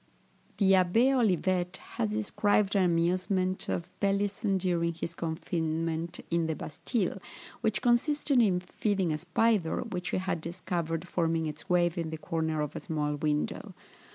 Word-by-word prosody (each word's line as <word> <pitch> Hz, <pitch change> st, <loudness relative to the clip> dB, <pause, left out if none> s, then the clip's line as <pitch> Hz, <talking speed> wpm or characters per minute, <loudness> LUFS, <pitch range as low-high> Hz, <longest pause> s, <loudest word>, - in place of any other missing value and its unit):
The 195 Hz, -2 st, +4 dB
Abbé 195 Hz, +8 st, +4 dB
Olivet 185 Hz, -5 st, +1 dB
has 225 Hz, -3 st, -3 dB
described 210 Hz, -1 st, +1 dB
an 195 Hz, -, +4 dB
amusement 185 Hz, +2 st, +1 dB
of 170 Hz, -, -2 dB
Pelisson 200 Hz, 0 st, +1 dB
during 170 Hz, -2 st, 0 dB
his 170 Hz, 0 st, -4 dB
confinement 165 Hz, 0 st, -2 dB
in 170 Hz, -1 st, +1 dB
the 160 Hz, -, -1 dB
Bastile, 190 Hz, -, -2 dB, 0.4 s
which 220 Hz, -3 st, 0 dB
consisted 265 Hz, +2 st, +3 dB
in 190 Hz, -5 st, +3 dB
feeding 190 Hz, -1 st, -1 dB
a 150 Hz, -, -2 dB
spider, 180 Hz, 0 st, +1 dB
which 180 Hz, -6 st, -4 dB
he -, -, 0 dB
had 185 Hz, -3 st, -2 dB
discovered 170 Hz, -1 st, -3 dB
forming 165 Hz, -2 st, 0 dB
its 150 Hz, 0 st, -6 dB
web 175 Hz, 0 st, +2 dB
in 165 Hz, -1 st, -2 dB
the 160 Hz, -, -5 dB
corner 160 Hz, 0 st, -1 dB
of 150 Hz, -, -3 dB
a -, -, -3 dB
small 150 Hz, -2 st, -2 dB
window. 150 Hz, 0 st, -2 dB
180 Hz, 150 wpm, -29 LUFS, 165-200 Hz, 0.4 s, The